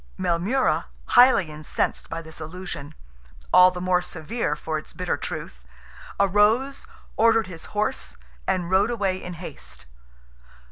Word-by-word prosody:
Maelmurra, 190 +11 +1 0.2
highly 245 -10 +6
incensed 150 0 -2
by 165 0 -5
this 160 0 -9
allusion—all 145 - 0
the 180 -1 -6
more 180 0 +2
severe 175 0 -3
for 155 0 -3
its - - -12
bitter - - -1
truth—arose, 200 - -1 0.3
ordered 225 0 +4
his 165 -3 -9
horse, 210 +1 -2 0.3
and 180 -1 0
rode 190 +4 +4
away 200 -6 0
in 180 - -6
haste. 65 - -9
180 Hz, 120 wpm, -24 LUFS, 155-205 Hz, 0.3 s, highly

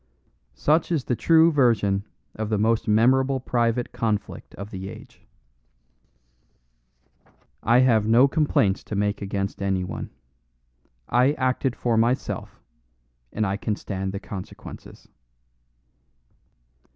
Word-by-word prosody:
Such 155 - +1
is 155 -6 0
the 125 - -1
true 165 +5 +5
version 105 -8 +2 0.3
of 110 -1 -4
the 110 - +1
most 110 +2 +1
memorable 130 +5 +3
private 120 -1 0
conflict 110 -3 -3
of 100 +2 -8
the 95 0 -6
age. 110 +1 -13 2.4
I 120 +3 +4
have 110 -4 +3
no 120 +5 +6
complaints 135 -10 +1
to 105 - -5
make 105 +1 -1
against 100 0 -3
any 95 -1 0
one. 90 - -6 1.0
I 125 +4 +3
acted 130 -2 -1
for 120 -2 0
myself, 120 +3 -1 0.7
and 110 - -1
I 95 0 -1
can 105 0 -2
stand 95 -2 -4
the 100 - -5
consequences. 95 -2 -10
110 Hz, 115 wpm, -24 LUFS, 100-130 Hz, 2.4 s, no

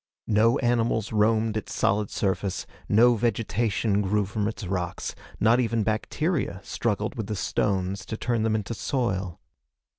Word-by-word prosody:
No 115 +3 +3
animals 115 -3 +1
roamed 110 +1 +2
its 110 - -4
solid 105 0 +1
surface. 95 -1 -1 0.2
No 120 +4 +6
vegetation 110 -2 0
grew 105 +1 +1
from 105 +1 -2
its 110 -2 -5
rocks. 90 -1 -3 0.3
Not 115 +3 +4
even 115 -2 +1
bacteria 120 - -1
struggled 105 -2 -1
with 110 -4 -4
the 105 - -2
stones 95 -1 -1
to 110 - -4
turn 120 -1 0
them 110 0 +1
into 105 +1 -2
soil. 100 - -2
110 Hz, 145 wpm, -26 LUFS, 100-115 Hz, 0.3 s, No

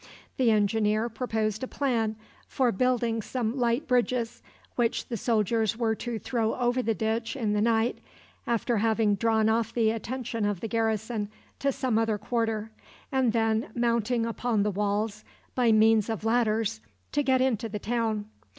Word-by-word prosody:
The 255 -3 +3
engineer 215 +1 +2
proposed 220 -2 -2
a 260 - -3
plan 230 -7 0 0.3
for 255 -3 +1
building 235 0 +1
some 235 +1 -2
light 245 +4 0
bridges, 245 -2 0 0.3
which 235 -2 0
the 240 - -2
soldiers 225 0 +1
were 230 -2 +1
to 235 +1 -4
throw 225 -1 -1
over 245 0 +1
the 225 -2 0
ditch 225 +3 -1
in 220 -6 0
the 210 - +1
night, 225 +1 +2 0.5
after 235 0 +1
having 220 -1 +2
drawn 220 +1 +2
off 225 0 +1
the 225 -2 +2
attention 230 0 -3
of 205 -3 0
the 225 - -4
garrison 220 -1 -1 0.3
to 275 - +1
some 250 -4 0
other 225 -2 +1
quarter, 225 -1 -2 0.4
and 260 -4 +2
then, 225 -1 +1
mounting 235 0 +1
upon 230 -2 0
the 210 - 0
walls 205 +2 -1 0.3
by 245 -3 +3
means 220 0 +4
of 220 -1 -3
ladders, 225 -1 +1 0.3
to 290 - +1
get 265 -2 +3
into 235 -4 +1
the 210 - -4
town. 220 -1 -1
225 Hz, 160 wpm, -27 LUFS, 220-240 Hz, 0.5 s, means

